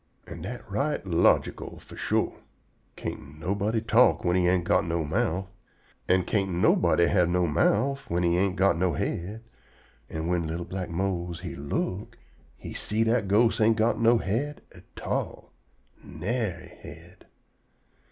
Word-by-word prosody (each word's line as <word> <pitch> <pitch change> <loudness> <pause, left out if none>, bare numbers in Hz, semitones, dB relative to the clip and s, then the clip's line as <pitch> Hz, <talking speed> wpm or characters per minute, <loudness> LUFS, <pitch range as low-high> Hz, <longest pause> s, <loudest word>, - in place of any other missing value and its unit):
An' - - -9
dat - - -6
right - - -1
logical - - +1
fo' - - -13
shore. - - -1 0.6
Can't 70 +2 -7
nobody 100 +6 -1
talk 115 +3 +4
whin 90 0 +2
he 90 -1 +3
ain't 90 -1 +2
got 90 - +2
no 85 -2 -1
mouf, 95 +2 0 0.6
an' 95 0 +3
can't 95 -1 0
nobody 85 -1 +3
have 85 0 +3
no 90 0 +2
mouf 105 - +1
whin 85 +1 0
he 85 0 +3
ain't 95 +1 +1
got 95 -3 +2
no 90 -2 +2
head, 100 +9 -3 0.7
an' 80 0 -4
whin 85 -1 0
li'l 85 +2 -4
black 95 -1 -5
Mose 85 -1 -2
he - - -6
look, 90 +7 -3 0.4
he - - -8
see 110 +2 -1
dat 115 -2 +1
ghost 110 +4 +3
ain't 110 +1 +4
go 115 +2 +3
no 115 +1 +4
head 125 +9 -2
at - - -14
all. - - -3 0.5
Nary 110 -2 -3
head. - - -13
95 Hz, 150 wpm, -27 LUFS, 85-110 Hz, 0.7 s, talk